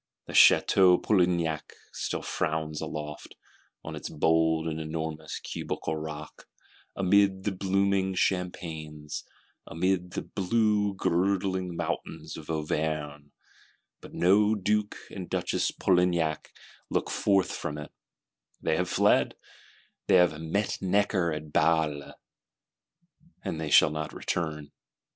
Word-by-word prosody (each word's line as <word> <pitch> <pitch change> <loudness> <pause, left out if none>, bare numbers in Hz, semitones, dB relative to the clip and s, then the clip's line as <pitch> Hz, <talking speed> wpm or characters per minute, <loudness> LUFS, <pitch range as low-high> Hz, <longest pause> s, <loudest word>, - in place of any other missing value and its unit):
The - - -9
Château 90 -2 +6
Polignac 85 -6 +1 0.2
still - - -3
frowns 75 -1 -2
aloft, 75 -1 -6 0.5
on - - -6
its - - -6
"bold 80 +1 +2
and 80 0 -3
enormous" 80 0 -4
cubical 80 - -4
rock, 75 0 -8 0.5
amid 95 0 +3
the 105 - 0
blooming 95 0 +1
champaigns, 80 -5 -3 0.4
amid 90 +1 -1
the - - -3
blue 105 0 +1
girdling 95 0 0
mountains 80 -1 -4
of 80 - -10
Auvergne: 75 -2 -3 0.7
but - - -12
no 105 +4 +3
Duke 105 +1 0
and 90 -3 -7
Duchess - - 0
Polignac 85 -4 +1 0.4
look - - -1
forth 95 -2 +2
from 75 - -4
it; 75 - -8 0.7
they 80 - 0
have 90 0 -1
fled, - - +3 0.7
they - - +5
have 90 -4 +4
"met 100 +6 -1
Necker 95 -2 +1
at 75 -1 -6
Bale;" 75 -3 +1 1.3
they 80 -2 -3
shall 75 - +6
not 75 -1 -4
return. 75 -4 -3
85 Hz, 110 wpm, -28 LUFS, 75-95 Hz, 1.3 s, Château